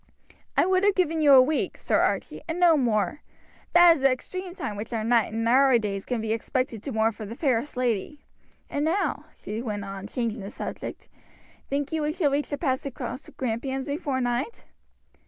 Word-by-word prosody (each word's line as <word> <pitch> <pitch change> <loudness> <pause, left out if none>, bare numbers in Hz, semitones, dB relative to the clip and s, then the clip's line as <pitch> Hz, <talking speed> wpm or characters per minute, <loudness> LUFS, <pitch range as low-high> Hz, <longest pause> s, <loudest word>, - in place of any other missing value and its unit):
"I - - +5
would 375 +1 +2
have 405 -1 +4
given 330 -3 +1
you 290 -2 +6
a 260 - +10
week, 300 +3 -1
Sir - - +1
Archie, - - -1
and 330 +1 -3
no 345 -2 +6
more; 230 - 0 0.5
that 350 -1 +8
is 285 - -6
the 270 - +5
extreme 365 +7 -5
time 280 - -4
which 210 +3 -6
a 225 -2 -1
knight 230 -1 +2
in 225 +1 -1
our 260 +1 +5
days 200 -3 -3
can 245 -3 -2
be 220 0 -1
expected 230 0 -2
to 275 - -5
mourn 220 -1 +2
for 220 - -9
the 215 +2 -7
fairest 260 -1 0
lady; 250 +3 -2 0.4
and 285 - -2
now," 345 +6 0
she 215 +2 -6
went 210 -4 -4
on, 195 0 -7
changing 230 -2 -3
the 195 - -6
subject, - - -7 0.6
"think 280 +1 -1
you 320 -1 -1
we 300 0 0
shall 310 -5 +1
reach 285 +1 -1
the 285 - -2
pass 265 -3 -1
across 260 -1 -5
the - - -16
Grampians 260 +2 -3
before 285 -2 -2
night?" 245 - -2
260 Hz, 205 wpm, -26 LUFS, 225-300 Hz, 0.6 s, a